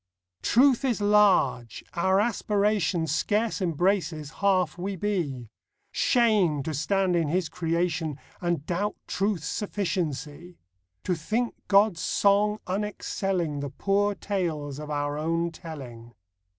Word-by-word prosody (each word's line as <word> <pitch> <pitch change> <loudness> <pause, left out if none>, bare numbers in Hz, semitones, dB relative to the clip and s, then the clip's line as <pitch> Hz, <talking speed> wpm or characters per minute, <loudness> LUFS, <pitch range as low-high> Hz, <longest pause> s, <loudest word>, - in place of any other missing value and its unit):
Truth 260 +1 +4
is 245 -6 +1
large. 205 - +3
Our 190 +3 +2
aspiration 205 -5 +1
Scarce 210 +8 0
embraces 170 -3 0
half 185 -5 +2
we 190 +3 -4
be. 160 - -2 0.4
Shame! 205 - +2
to 160 - -3
stand 185 +5 +1
in 165 -3 +1
His 175 +2 0
creation 165 -3 -1 0.2
And 170 -5 -1
doubt 200 +5 -1
Truth's 195 -5 -1
sufficiency! 175 -4 -3 0.5
To 180 - 0
think 220 +9 -1
God's 200 -3 +4
song 205 +3 +2
unexcelling 190 -5 -2
The 140 - -3
poor 200 +7 0
tales 160 -9 -3
of 150 0 -7
our 145 0 -2
own 165 +2 0
telling. 125 -8 -10
180 Hz, 115 wpm, -26 LUFS, 155-205 Hz, 0.5 s, Truth